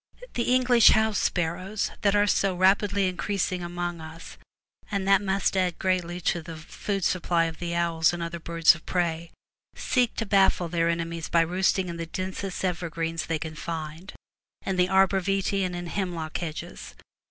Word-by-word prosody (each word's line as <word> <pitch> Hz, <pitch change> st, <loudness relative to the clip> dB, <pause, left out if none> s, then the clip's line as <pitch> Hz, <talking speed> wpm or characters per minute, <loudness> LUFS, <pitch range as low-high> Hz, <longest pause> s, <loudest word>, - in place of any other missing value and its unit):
The 240 Hz, 0 st, 0 dB
English 250 Hz, -2 st, +5 dB
house 220 Hz, -1 st, +4 dB
sparrows, 185 Hz, +4 st, -1 dB
that 200 Hz, -1 st, +3 dB
are 205 Hz, 0 st, +4 dB
so 195 Hz, -2 st, +1 dB
rapidly 195 Hz, +1 st, +3 dB
increasing 185 Hz, 0 st, -2 dB
among 175 Hz, -1 st, -4 dB
us, 160 Hz, +1 st, -10 dB, 0.5 s
and 200 Hz, -2 st, -2 dB
that 195 Hz, 0 st, +5 dB
must 195 Hz, -1 st, 0 dB
add 180 Hz, -2 st, +1 dB
greatly 180 Hz, -2 st, -1 dB
to 175 Hz, 0 st, 0 dB
the 165 Hz, 0 st, -8 dB
food 195 Hz, +5 st, -4 dB
supply 175 Hz, -2 st, +1 dB
of 165 Hz, -1 st, -4 dB
the 170 Hz, -1 st, -3 dB
owls 170 Hz, -1 st, +2 dB
and 175 Hz, -1 st, -4 dB
other 170 Hz, 0 st, -5 dB
birds 165 Hz, 0 st, +4 dB
of 170 Hz, -, -12 dB
prey, 170 Hz, -2 st, -1 dB, 0.5 s
seek 250 Hz, -3 st, 0 dB
to 225 Hz, -, -2 dB
baffle 195 Hz, -4 st, +3 dB
their 165 Hz, 0 st, +1 dB
enemies 165 Hz, -1 st, -3 dB
by 170 Hz, -, +4 dB
roost 180 Hz, +4 st, +1 dB
ing 190 Hz, -1 st, -1 dB
in 170 Hz, -1 st, -5 dB
the 165 Hz, 0 st, -5 dB
densest 190 Hz, +2 st, -4 dB
evergreens 165 Hz, -2 st, -3 dB
they 165 Hz, 0 st, 0 dB
can 155 Hz, 0 st, -6 dB
find, 160 Hz, +2 st, -6 dB, 0.5 s
in 190 Hz, -, -1 dB
the 180 Hz, 0 st, +2 dB
arbor 190 Hz, 0 st, +3 dB
vitse, 195 Hz, +1 st, 0 dB
and 180 Hz, -1 st, -2 dB
in 175 Hz, 0 st, -5 dB
hemlock 170 Hz, -4 st, -4 dB
hedges. 155 Hz, -, -7 dB
175 Hz, 175 wpm, -26 LUFS, 165-195 Hz, 0.5 s, English